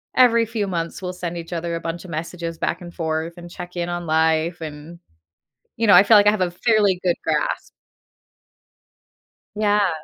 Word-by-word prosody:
every 235 Hz, -2 st, +5 dB
few 220 Hz, -2 st, -2 dB
months 170 Hz, -1 st, -3 dB
we'll 180 Hz, -1 st, -3 dB
send 175 Hz, -1 st, -5 dB
each 165 Hz, 0 st, -8 dB
other 170 Hz, 0 st, -3 dB
a 165 Hz, -, -4 dB
bunch 170 Hz, +2 st, -5 dB
of -, -, -10 dB
messages 165 Hz, +1 st, -5 dB
back -, -, -2 dB
and 175 Hz, -1 st, -10 dB
forth, 160 Hz, 0 st, -2 dB
and 175 Hz, 0 st, -10 dB
check 180 Hz, 0 st, -9 dB
in 175 Hz, 0 st, -2 dB
on 175 Hz, 0 st, -4 dB
life, 160 Hz, +2 st, +1 dB
and, 155 Hz, +2 st, -8 dB, 0.8 s
you 230 Hz, -, +1 dB
know, 200 Hz, -, +7 dB
I 180 Hz, -, +9 dB
feel 215 Hz, +1 st, +6 dB
like 205 Hz, 0 st, +5 dB
I -, -, +8 dB
have 210 Hz, -3 st, -2 dB
a 180 Hz, -, +1 dB
fairly 205 Hz, -1 st, +2 dB
good 175 Hz, -2 st, +2 dB
grasp. -, -, -1 dB, 1.9 s
Yeah. 205 Hz, -2 st, +2 dB
175 Hz, 190 wpm, -22 LUFS, 165-200 Hz, 1.9 s, I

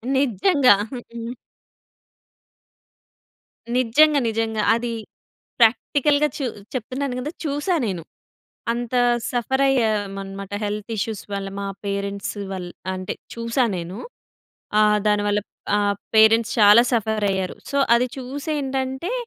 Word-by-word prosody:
నిజంగా. 265 Hz, -, +4 dB, 0.2 s
హ్మ్. 235 Hz, 0 st, -7 dB, 2.4 s
నిజంగా, 285 Hz, +5 st, +4 dB
నిజంగా. 220 Hz, -1 st, -1 dB
అది 235 Hz, 0 st, -2 dB, 0.7 s
ప్రాక్టికల్‌గా 285 Hz, +5 st, +3 dB
చూ 275 Hz, -, -2 dB, 0.3 s
చెప్తున్నాను 255 Hz, +2 st, -3 dB
కదా! 295 Hz, +5 st, -4 dB
చూసా 295 Hz, +5 st, 0 dB
నేను. 180 Hz, -5 st, -3 dB, 0.7 s
అంత 240 Hz, +1 st, -4 dB, 0.4 s
సఫర్ 265 Hz, +3 st, 0 dB
అయ్యామన్నమాట, 200 Hz, -5 st, -1 dB
హెల్త్ 210 Hz, +2 st, -4 dB
ఇష్యూస్ 215 Hz, 0 st, -3 dB
వల్ల 195 Hz, 0 st, -3 dB
మా 200 Hz, -, -3 dB, 0.2 s
పేరెంట్స్ 200 Hz, +1 st, -3 dB, 0.2 s
వల్ 180 Hz, -2 st, -5 dB, 0.2 s
అంటే 185 Hz, 0 st, -4 dB, 0.2 s
చూశా 230 Hz, +2 st, 0 dB
నేను. 175 Hz, +3 st, -5 dB, 0.8 s
ఆహ్, 210 Hz, 0 st, +4 dB
దాని 210 Hz, 0 st, +2 dB
వల్ల 205 Hz, 0 st, +2 dB, 0.4 s
ఆహ్, 205 Hz, -1 st, +1 dB, 0.2 s
పేరెంట్స్ 225 Hz, +1 st, +5 dB
చాలా 210 Hz, +2 st, +8 dB
సఫర్ 220 Hz, -2 st, 0 dB
అయ్యారు. 190 Hz, -1 st, -2 dB, 0.2 s
సో, 280 Hz, -, 0 dB, 0.2 s
అది 245 Hz, +2 st, +3 dB
చూసి 275 Hz, +4 st, -6 dB
ఏంటంటే, 265 Hz, -, -2 dB
225 Hz, 110 wpm, -22 LUFS, 205-265 Hz, 2.4 s, చాలా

